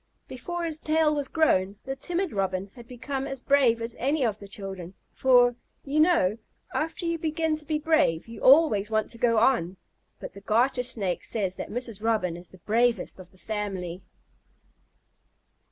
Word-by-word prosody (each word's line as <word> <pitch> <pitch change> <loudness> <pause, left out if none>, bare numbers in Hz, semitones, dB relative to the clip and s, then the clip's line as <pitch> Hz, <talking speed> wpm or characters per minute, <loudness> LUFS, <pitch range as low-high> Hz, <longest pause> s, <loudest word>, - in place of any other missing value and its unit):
Before 345 +8 -5
his 315 -2 -2
tail 310 -1 +2
was 290 -2 -1
grown 200 - +2
the 270 0 -3
timid 350 +6 -2
Robin 195 -1 -2
had 240 -2 -13
become 265 +2 -4
as 270 - -5
brave 250 -4 +3
as 230 0 -3
any 275 +1 +1
of 215 -2 -1
the 200 - -10
children, 195 -3 -6 0.2
for, 245 -2 +4 0.3
you 290 +2 0
know, 310 - +3 0.3
after 325 +3 -2
you 335 -1 -1
begin 320 0 0
to 305 - -9
be 310 0 0
brave 305 - +1
you 230 - -10
always 255 -8 +5
want 215 -1 0
to 230 - -8
go 230 -1 +3
on. 205 -6 +2 0.4
But - - -8
the 200 - -12
Garter 245 +5 +2
Snake 200 -7 -2
says 195 -5 -2
that - - -6
Mrs. 230 -3 -4
Robin 215 -7 0
is 175 0 -10
the 185 - -15
bravest 230 +3 0
of 180 -1 -12
the 185 - -19
family. 190 -4 -4
235 Hz, 175 wpm, -26 LUFS, 200-295 Hz, 0.4 s, always